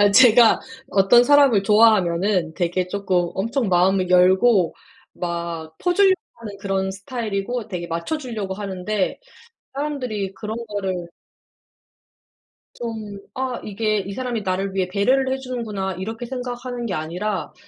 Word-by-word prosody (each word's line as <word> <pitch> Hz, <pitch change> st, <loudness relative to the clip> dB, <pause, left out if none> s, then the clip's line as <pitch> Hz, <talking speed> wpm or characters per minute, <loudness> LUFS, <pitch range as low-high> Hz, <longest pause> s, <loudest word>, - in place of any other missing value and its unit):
아 205 Hz, 0 st, +6 dB
제가 235 Hz, 0 st, +7 dB, 0.3 s
어떤 200 Hz, +5 st, +5 dB
사람을 275 Hz, -7 st, +5 dB
좋아하면은 195 Hz, -5 st, +3 dB
되게 180 Hz, 0 st, -1 dB
쪼끔 185 Hz, -3 st, 0 dB
엄청 230 Hz, +3 st, -1 dB
마음을 185 Hz, +1 st, +3 dB
열고 185 Hz, +1 st, +4 dB, 0.4 s
막 170 Hz, -2 st, -5 dB
퍼주려고 375 Hz, +1 st, +3 dB, 0.2 s
하는 210 Hz, -3 st, -8 dB
그런 190 Hz, -1 st, -1 dB
스타일이고 215 Hz, +2 st, -4 dB
되게 175 Hz, -3 st, -4 dB
맞춰 170 Hz, -, -3 dB
주려고 225 Hz, -9 st, -5 dB
하는데 195 Hz, 0 st, -2 dB, 0.6 s
사람들이 250 Hz, -9 st, -3 dB
그런 210 Hz, +3 st, -6 dB
거를 190 Hz, -4 st, -3 dB, 1.7 s
좀 220 Hz, -4 st, -6 dB, 0.2 s
아 260 Hz, -1 st, -2 dB
이게 215 Hz, 0 st, -1 dB
'이 195 Hz, 0 st, -5 dB
사람이 245 Hz, -2 st, -3 dB
나를 190 Hz, 0 st, -2 dB
위해 190 Hz, -2 st, 0 dB
배려를 255 Hz, +8 st, +1 dB
해 265 Hz, -, 0 dB
주는구나.' 225 Hz, -7 st, -4 dB
이렇게 225 Hz, +6 st, -5 dB
생각하는 245 Hz, -1 st, -5 dB
게 195 Hz, -, -3 dB
아니라 180 Hz, +7 st, -3 dB
205 Hz, 295 characters per minute, -22 LUFS, 185-240 Hz, 1.7 s, 제가